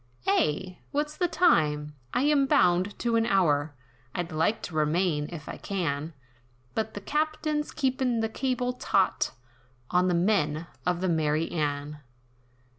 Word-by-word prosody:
"Eh! 180 +4 +1
what's 300 +1 -2
the 355 - +1
time, 150 - +2 0.2
I 250 - +1
am 290 -2 +3
bound 180 -1 +3
to 235 -1 +1
an 225 0 +2
hour, 150 -6 +2 0.4
I'd 175 0 -3
like 165 +8 0
to - - -6
remain, 155 0 +1
if 155 -4 -8
I - - -6
can, 165 -5 -2 0.6
But 220 0 -2
the 205 - -5
captain's 305 +3 -1
keepin' 260 -4 0
the 225 - +1
cable 250 +1 -1
taut, 195 -6 +1 0.6
On 180 +1 +3
the 180 - +2
men 170 -4 +1 0.2
of 180 -1 +1
the 190 - +1
'Mary 160 -1 +1
Anne.' 150 -2 -2
185 Hz, 145 wpm, -28 LUFS, 155-250 Hz, 0.6 s, am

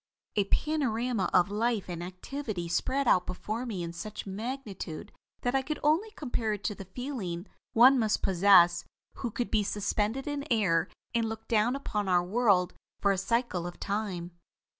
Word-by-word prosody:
"A 205 -2 +3
panorama 245 -5 0
of 180 +2 +4
life 225 0 0
and 175 -2 -5
activity 185 +1 -5
spread 260 +10 0
out 180 -4 +4
before 220 +6 -4
me 195 -7 -3
in 170 0 -5
such 205 +5 -6
magnitude 205 - -5 0.3
that 245 - 0
I 270 - +3
can 300 +3 -3
only 320 +9 +3
compare 240 - -1
it 205 -2 -6
to 195 - 0
the 195 - -9
feeling 210 -10 -4 0.3
one 255 +3 +7
must 220 -2 +1
possess 175 -2 +6 0.3
who 240 - -2
could 240 +2 -3
be 220 - +3
suspended 210 +5 -1
in 290 -1 -3
air 190 -7 +3 0.3
and 230 -2 +1
look 220 0 -7
down 225 +3 +2
upon 210 -7 -2
our 175 -1 +4
world 195 -2 +2 0.3
for 200 - +3
a 195 - +1
cycle 195 -4 0
of 175 - -9
time. 195 -4 -3
210 Hz, 170 wpm, -29 LUFS, 185-245 Hz, 0.3 s, one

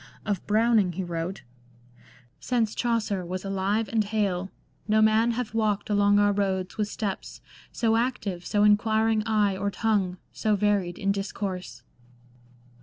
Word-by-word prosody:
Of 205 -4 -2
Browning 215 -3 +3
he 190 +3 -3
wrote: 175 +2 -4 0.3
— 120 0 -28
" - - -23 0.3
Since 230 -4 0
Chaucer 225 -5 -1
was 185 +2 -5
alive 195 +3 0
and 225 -2 +1
hale, 200 -3 -1 0.4
No 215 0 +3
man 220 +2 +4
hath 230 -2 -4
walked 215 -2 0
along 205 0 +4
our 205 0 +4
roads 190 -2 -1
with 210 -1 -1
steps 205 -2 -5 0.3
So 225 -1 +1
active, 225 -7 -1
so 205 +3 +1
inquiring 220 +1 +3
eye, 210 -3 +2
or 200 +2 -1
tongue 200 -3 0 0.2
So 215 -2 +1
varied 200 -4 0
in 195 - 0
discourse." 195 -2 -4
205 Hz, 150 wpm, -26 LUFS, 190-220 Hz, 0.4 s, man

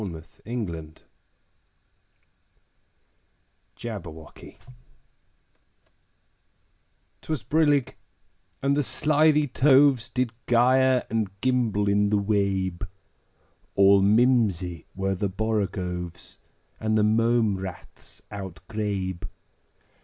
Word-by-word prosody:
Lewis 80 -4 -9
Carroll 85 -10 -5 2.8
Jabberwocky 85 -9 -9 2.6
'TWAS 155 -7 -4
brillig, 145 -4 +2 0.7
and 140 0 +2
the 145 - +2
slithy 150 +2 +2
toves 135 -2 +4
Did 125 -3 -2 0.2
gyre 130 +2 +3
and 110 -3 0
gimble 120 -6 +1
in 100 0 +2
the 105 - +2
wabe: 100 -3 -1 0.9
All 100 0 +6
mimsy 100 -5 +2
were 95 0 -1
the 95 +1 -2
borogoves, 90 -4 -3 0.4
And 110 0 0
the 105 - +3
mome 110 -1 +2
raths 95 -2 -10
outgrabe. 95 -1 -5
105 Hz, 80 wpm, -25 LUFS, 95-125 Hz, 2.8 s, All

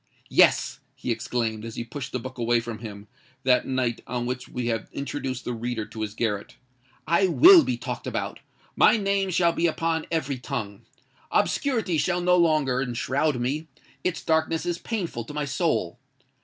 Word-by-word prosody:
"Yes!" - - +4 0.2
he - - -3
exclaimed, 115 -1 -2
as 115 -1 -7
he - - -3
pushed 125 +3 -7
the - - -1
book 130 +1 -8
away 120 0 +3
from 115 -1 -6
him, 105 -2 -9 0.4
that 125 -1 +3
night 130 -3 -1
on 120 -1 -2
which 125 +1 -4
we 125 -1 -4
have 115 -2 -2
introduced 135 -2 -4
the 125 - -2
reader 120 -1 -3
to 110 +1 -8
his 105 0 -4
garret: 105 -3 -2 0.5
"I 170 +4 +3
will 340 - +8
be - - -1
talked - - -5
about—my - - 0
name 195 -1 0
shall 170 -1 +3
be 170 - +2
upon 165 0 -1
every 145 -5 -1
tongue! 110 -7 -5 0.5
Obscurity 225 - +1
shall 180 +2 +1
no 180 0 +3
longer 155 -7 +3
enshroud 135 +3 0
me: 145 +6 -2 0.4
its 180 - -2
darkness 160 0 +1
is 175 0 -2
painful 180 - -3
to 150 - -9
my 150 -1 -1
soul. 140 - -1
130 Hz, 170 wpm, -25 LUFS, 120-165 Hz, 0.5 s, will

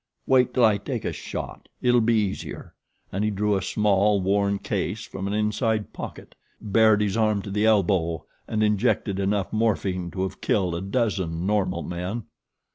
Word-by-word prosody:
Wait 130 -2 +4
till 125 - +4
I 105 -2 +3
take 100 - -4
a - - -1
shot - - -7
it'll 125 -1 +3
be 115 +1 +3
easier," 105 -3 -3 0.4
and 100 +3 -1
he 105 - +2
drew 105 0 +1
a 95 - 0
small, 100 +1 +2
worn 100 +1 +1
case - - -3
from 95 0 -5
an 100 - -2
inside 105 +1 0
pocket, - - -8 0.3
bared 110 0 +4
his 100 -2 0
arm 110 -3 +1
to 100 - -6
the 105 +2 +2
elbow 90 -7 +2 0.2
and 110 -1 0
injected 100 -1 +1
enough 100 0 0
morphine 100 -5 0
to 95 +1 -3
have 95 - -5
killed 95 -5 +1
a 85 - -3
dozen 95 -5 -1
normal 95 -4 0
men. 90 +6 -4
100 Hz, 175 wpm, -25 LUFS, 95-110 Hz, 0.4 s, Wait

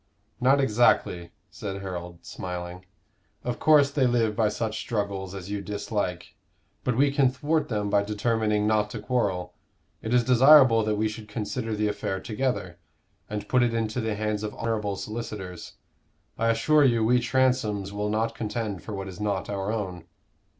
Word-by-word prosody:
"Not 135 +3 +4
exactly," 105 -8 +2 0.2
said 100 -1 -6
Harold, 90 -2 -7
smiling. 90 0 -6 0.6
"Of 125 -1 -3
course 145 -2 +5
they 140 -3 +2
live 115 -3 +1
by 110 -2 +2
such 110 0 -3
struggles 100 -3 -3
as 95 0 -7
you 100 -1 -2
dislike. 100 -3 -3 0.5
But 125 -2 0
we 140 +1 +4
can 140 -2 +3
thwart 150 +3 -1
them 105 -5 -1
by 100 - +4
determining 105 0 0
not 105 -1 +2
to 110 - -6
quarrel. 105 -6 -1 0.5
It 110 - -4
is 125 -1 +4
desirable 130 -1 +7
that 110 0 +1
we 110 +1 +1
should 110 0 -7
consider 110 +1 -3
the 105 0 0
affair 100 -2 -2
together, 105 -5 -3 0.5
and 105 0 -4
put 125 - +3
it 120 -1 +1
into 115 +1 -1
the 110 -1 -2
hands 105 0 -2
of 105 -1 -5
honorable 105 -3 -2
solicitors. 105 -5 -6 0.6
I 115 +1 +1
assure 145 +7 +4
you 115 -4 +3
we 125 +2 +4
Transomes 120 -5 +1
will 105 0 -2
not 110 +2 0
contend 105 -3 -4
for 105 - -6
what 95 0 -5
is 95 -2 -9
not 100 -1 -2
our 100 +1 -2
own." 95 -6 -4
110 Hz, 170 wpm, -26 LUFS, 100-120 Hz, 0.6 s, desirable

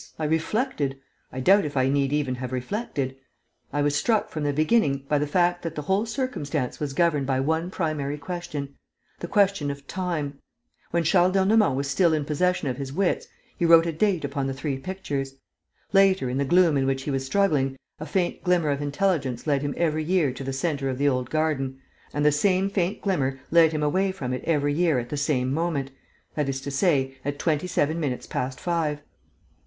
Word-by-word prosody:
I 155 - -2
reflected. 160 - -1 0.3
I 130 - -5
doubt 195 +8 +5
if 145 -2 -4
I 130 0 +3
need 140 0 +1
even 145 -3 0
have 125 0 -5
reflected. 135 - -3 0.6
I 145 +1 0
was 145 0 +2
struck, 215 +8 +1
from 155 - -4
the 145 - +1
beginning, 145 -3 +2
by 150 0 +2
the 150 - -1
fact 175 +3 +2
that 165 -1 -5
the 150 - -4
whole 195 +8 +1
circumstance 155 - -3
was 145 -2 -3
governed 155 -6 +2
by 130 -1 +1
one 160 +5 0
primary 155 -5 -2
question: 145 -3 -5 0.5
the 175 - -5
question 195 -6 +2
of 140 0 -6
time. 155 -5 -3 0.5
When 170 0 +1
Charles 180 +2 +3
d'Ernemont 195 -4 +3
was 140 +1 -1
still 165 +3 +3
in 150 -2 -2
possession 170 +2 0
of 125 -2 -2
his 135 -1 -5
wits, 185 +5 0 0.3
he - - -3
wrote 165 0 +7
a 170 - 0
date 180 -1 +1
upon 140 -1 -2
the 135 - -3
three 135 -1 -3
pictures. 140 -6 -4 0.6
Later, 190 -9 +4
in 130 - -1
the 140 - +1
gloom 170 0 +4
in 135 -1 +1
which 135 0 -1
he 145 - -3
was 135 -1 -1
struggling, 135 -4 +1 0.2
a 155 - -6
faint 175 +3 -1
glimmer 175 -5 +2
of 140 0 -2
intelligence 145 -4 -1
led 140 -3 +1
him 145 -1 -3
every 155 -2 +1
year 160 -5 +1
to 135 - -7
the 135 - -3
centre 135 -1 -1
of 130 - -3
the 145 +2 +2
old 130 -2 0
garden; 150 -4 -1 0.3
and 145 0 -1
the 150 - +6
same 190 +5 +2
faint 190 0 -1
glimmer 135 -9 0
led 165 -1 +6
him 155 -1 -2
away 190 +6 +1
from 130 -9 -4
it 125 - -4
every 145 -3 +1
year 165 -2 +2
at 120 -1 -3
the - - -3
same 135 -3 0
moment, 150 -4 -1 0.4
that 150 -2 -1
is 135 0 -2
to 140 +1 -6
say, 135 -3 +1
at 145 0 -3
twenty 155 +2 0
seven 160 -1 0
minutes 135 -6 -2
past 130 +1 -3
five. 155 -4 -1
150 Hz, 205 wpm, -25 LUFS, 135-175 Hz, 0.6 s, wrote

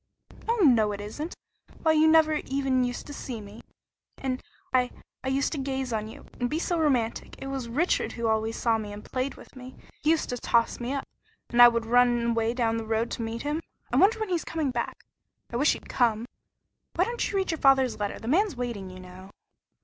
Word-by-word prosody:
"Oh, 465 - +4
no, 225 -8 +5
it 200 - -6
isn't! 260 +11 -6 0.5
Why, 320 - +5
you 315 0 +5
never 315 -1 +5
even 270 -2 +1
used 245 0 -3
to 290 - -8
see 250 -4 -6
me. 205 +1 -11 0.6
And 260 -1 -3 0.3
I 250 -1 +3 0.3
I - - -4
used 270 +1 +1
to 300 - -3
gaze 265 -2 -2
on 215 -1 -2
you 220 - -11
and 245 -1 0
be 305 - -1
so 340 0 0
romantic! 255 -8 0
It - - -8
was 270 -3 -4
Richard 305 +10 +1
who 235 - -4
always 220 0 +1
saw 230 -2 +1
me 210 -1 -6
and 205 0 -9
played 255 +2 -2
with - - -15
me. 255 0 -10 0.3
He 300 - +1
used 325 -1 +2
to 245 - -2
toss 230 0 +2
me 240 +1 -3
up, 275 -1 -3 0.4
and 240 - +5
I 240 - +12
would 235 -1 +1
run 240 0 +3
away 230 0 0
down 230 -2 +1
the 225 -1 -5
road 225 +1 0
to - - -3
meet 225 +1 -4
him. 300 +3 -1 0.3
I - - +3
wonder 445 +4 +5
when 435 -2 -2
he's 345 -3 0
coming 315 -4 -2
back! 240 -1 -4 0.5
I - - -5
wish 290 +4 +4
he'd - - -9
come. 230 -2 +1 0.7
Why 355 - +3
don't 475 +4 -2
you 400 - -1
read 380 -2 0
your 325 - -3
father's 265 -4 +4
letter? 205 -1 -2
The 225 - -9
man's 365 - +2
waiting, 235 -6 -4
you 185 0 -10
know." 185 +1 -12
245 Hz, 225 wpm, -27 LUFS, 225-290 Hz, 0.7 s, I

